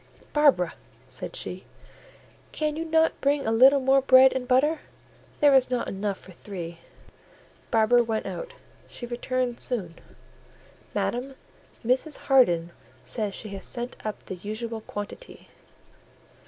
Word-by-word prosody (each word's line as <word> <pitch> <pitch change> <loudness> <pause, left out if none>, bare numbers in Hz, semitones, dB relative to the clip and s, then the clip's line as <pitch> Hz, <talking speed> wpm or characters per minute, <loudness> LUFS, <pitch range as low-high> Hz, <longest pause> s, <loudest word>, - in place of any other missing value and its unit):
"Barbara," 275 - +4 0.3
said - - -7
she, - - -6 0.9
"can 305 -1 -2
you 325 - -3
not 320 0 +2
bring 280 0 +1
a 220 - +1
little 265 +5 +6
more 270 +1 +4
bread 260 0 +7
and 255 -1 -3
butter? 290 +5 +3 0.6
There 290 -1 +6
is 260 -2 +5
not 250 -1 -1
enough 200 0 -3
for 185 - -15
three." 170 -2 -8 0.9
Barbara 235 +2 +4
went 225 -1 -2
out: - - -6 0.3
she 240 - -7
returned 245 0 -2
soon— 185 -10 -3 1.0
"Madam, 260 +3 -2 0.5
Mrs. 260 +5 +1
Harden 175 -11 +3 0.3
says 210 -4 -2
she 215 - -7
has 195 -1 -7
sent 245 0 -5
up 215 -1 -5
the - - -6
usual 220 +4 -5
quantity." 205 - -8
245 Hz, 130 wpm, -26 LUFS, 210-270 Hz, 1.0 s, bread